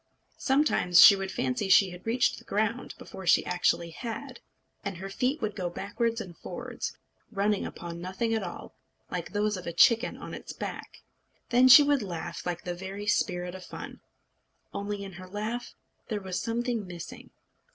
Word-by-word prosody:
Sometimes 265 - +3
she 200 - +11
would 195 -1 -4
fancy 225 -1 -1
she 190 0 +6
had 180 +4 -11
reached 240 +2 +2
the - - -17
ground 220 +4 -1
before 190 -2 -9
she - - +5
actually 175 -1 +1
had, 250 +7 -6 0.4
and 200 -3 -4
her 195 +2 -7
feet 255 +8 0
would 210 -1 -2
go 180 -3 -2
backwards 225 +6 -2
and 185 -6 -7
forwards, - - -6 0.3
running 205 -1 0
upon 170 0 -7
nothing 190 +6 -2
at 220 - +1
all, 175 -3 -7 0.4
like - - -4
those 210 -1 0
of 180 - -8
a - - -1
chicken 230 +8 +4
on - - -8
its - - -7
back. - - -7 0.5
Then 250 +1 +6
she 260 +3 +11
would 285 -2 +2
laugh 175 -3 -5
like 175 -1 -3
the 175 - -3
very 190 +3 -6
spirit 180 -3 0
of 185 0 -8
fun; - - -9 0.7
only 200 0 -3
in 195 - -7
her 185 +1 -10
laugh 215 +5 -4 0.3
there 215 -2 -2
was 190 -2 -3
something 235 -2 -2
missing. 175 -2 -9
200 Hz, 175 wpm, -28 LUFS, 180-230 Hz, 0.7 s, she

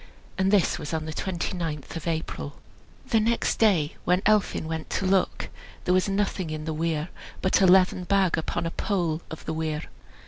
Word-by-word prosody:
And 190 0 +2
this 195 -4 +3
was 150 +2 -3
on 155 -1 -2
the 155 - -5
twenty 185 +2 -3
ninth 160 -5 -4
of 165 - -5
April. 160 -3 -3 0.5
The 225 - +4
next 230 +2 +1
day, 175 -9 +3
when 180 +2 +2
Elphin 210 -6 +2
went 160 0 -4
to - - -1
look, 190 0 +1 0.4
there 180 - +3
was 185 +2 +2
nothing 195 -3 -1
in 155 0 -4
the 160 - -2
weir 160 +1 -1 0.3
but 185 - +3
a 190 - +6
leathern 185 0 +5
bag 195 -2 +3
upon 160 0 -2
a 165 - -2
pole 170 -6 -1
of 160 - -8
the - - -2
weir. 155 -1 -2
175 Hz, 195 wpm, -26 LUFS, 160-190 Hz, 0.5 s, a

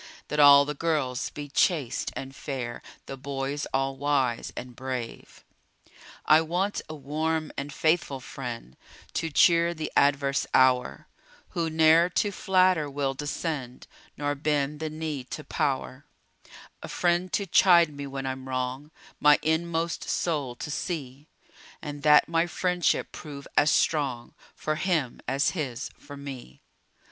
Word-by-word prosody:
That 150 - -2
all 140 -1 +8
the 150 - -3
girls 145 -5 -1
be 145 -1 -7
chaste 145 -2 0
and 135 0 -7
fair, 125 -5 -5 0.2
The 135 - -6
boys 140 +1 -3
all 135 0 0
wise 135 -4 0
and 125 -1 -7
brave. 130 -3 -6 0.8
I 155 +1 +6
want 180 +5 -1
a 155 - -6
warm 155 +2 -2
and 140 +1 -5
faithful 155 -3 +1
friend, 120 - -7 0.4
To 165 - -1
cheer 170 +2 +4
the 155 -1 -4
adverse 140 -1 +2
hour, 130 -1 +3 0.4
Who 165 -1 -2
ne'er 160 +2 +5
to 205 +3 0
flatter 185 -5 +2
will 140 -1 -1
descend, 145 -2 -4 0.3
Nor 145 0 -1
bend 145 0 -1
the 160 0 -3
knee 155 -3 -4
to 155 - -7
power, 135 -1 -2 0.8
A - - -7
friend 175 +1 0
to 200 - 0
chide 170 -3 +5
me 140 0 -6
when 135 0 -5
I'm 130 0 -5
wrong, 130 +3 -3 0.3
My 150 0 +6
inmost 165 +1 -1
soul 145 -8 -1
to 150 - -6
see; 145 -4 -5 0.5
And 145 -1 -7
that 150 0 +6
my 165 +1 +1
friendship 180 -1 0
prove 140 -2 -9
as 145 - +4
strong 135 -8 0 0.2
For 155 0 -2
him 160 -8 -1
as 135 +2 +1
his 140 -9 -4
for 145 0 -12
me. 135 - -9
145 Hz, 140 wpm, -27 LUFS, 135-160 Hz, 0.8 s, all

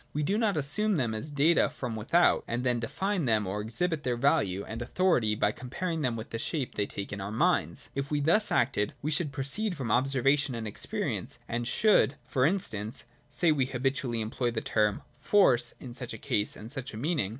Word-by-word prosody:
We 150 - -1
do 195 +7 +1
not 215 -5 +1
assume 195 +9 +2
them 120 -8 0
as 110 +8 -5
data 150 +4 +3
from 115 - -5
without, 145 +11 +3
and 120 +1 -2
then 125 -2 +1
define 190 - -1
them 110 -3 +2
or 100 +3 -3
exhibit 150 +9 -1
their 125 -4 -1
value 120 - +1
and 115 +2 -6
authority 120 - +1
by 105 0 +2
comparing 165 +8 -4
them 125 -5 0
with 110 -1 -7
the 115 - -3
shape 140 0 -2
they 100 -1 -1
take 100 +1 -5
in 100 - -5
our 100 - -4
minds. 170 +10 0
If 140 0 -3
we 150 - 0
thus 170 +9 +3
acted, 120 -4 +1
we 155 - -1
should 150 -1 +1
pro 135 0 -3
ceed 200 +8 0
from 130 -7 -3
observation 135 +2 +2
and 115 -1 -4
experience, 105 - -3
and 120 0 -2
should, 205 - +3
for 130 +2 +2
instance, 110 - -2 0.2
say 170 -2 +2
we 140 -4 +2
habitually 130 -2 -1
employ 115 +3 -1
the 115 -1 -2
term 105 -2 0
' - - -33
force 125 - +5
' - - -35
in 125 -2 -9
such 125 -1 -6
a - - -6
case, 105 0 0
and 110 +3 -8
such 135 -5 -6
a - - -6
meaning. 145 - 0
130 Hz, 215 wpm, -29 LUFS, 115-155 Hz, 0.2 s, force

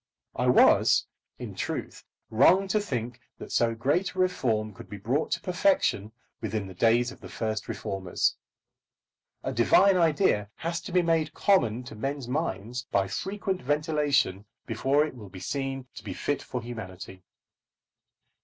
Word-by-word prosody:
I - - 0
was, - - +5 0.3
in - - -7
truth, - - -4 0.3
wrong 180 - +5
to 215 - +2
think 125 - -4 0.2
that - - -9
so 115 -1 +2
great 145 +12 0
a - - -5
reform 115 - 0
could - - -12
be 105 - -7
brought 125 +10 -1
to - - -1
perfection 180 - +1 0.3
within 110 -2 -2
the 95 - -9
days 120 +5 +3
of - - -14
the - - -10
first 110 -1 -3
reformers. 95 -4 -1 1.1
A - - -2
divine 185 - +5
idea 155 - +2
has 170 0 -3
to 185 - -8
be 180 0 +3
made 165 -2 +1
common 125 - +2
to 125 - -10
men's 135 +3 -4
minds 125 -4 -3
by 100 -1 +1
frequent 190 - -3
ventilation 145 - +1 0.2
before 135 +6 +2
it 155 - -7
will 110 -6 -11
be 95 0 -10
seen 135 +5 -3
to - - -10
be 95 -4 -6
fit 145 -1 -1
for 125 -2 -5
humanity. 95 -5 -8
125 Hz, 155 wpm, -27 LUFS, 110-165 Hz, 1.1 s, was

